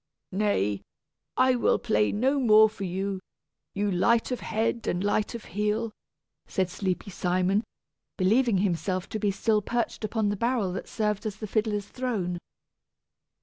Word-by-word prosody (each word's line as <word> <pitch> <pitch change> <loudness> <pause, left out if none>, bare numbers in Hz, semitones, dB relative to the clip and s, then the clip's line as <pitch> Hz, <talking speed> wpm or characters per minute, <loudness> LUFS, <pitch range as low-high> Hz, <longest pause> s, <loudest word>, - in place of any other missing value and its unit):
"Nay, 145 - +1 0.6
I 255 0 +5
will 240 - +3
play 105 0 +1
no 265 +7 +2
more 220 -3 +7
for 205 -2 -6
you, 190 +2 -2 0.6
you 205 0 0
light 225 +7 +2
of 250 - -1
head 225 +1 -1
and 175 +2 0
light 205 +2 0
of 230 - -7
heel," 210 +3 -1 0.6
said 185 -2 -1
sleepy 190 +1 -2
Simon, 185 +4 +1 0.5
believing 220 +3 +3
himself 185 0 0
to 215 - -3
be 205 - +1
still 210 +2 +1
perched 235 +2 -2
upon 215 -1 0
the 205 - 0
barrel 230 -4 0
that 190 - -5
served 210 -1 -1
as 210 - -4
the 215 - -6
fiddler's 210 -1 0
throne. 205 -9 -2
210 Hz, 150 wpm, -27 LUFS, 190-225 Hz, 0.6 s, more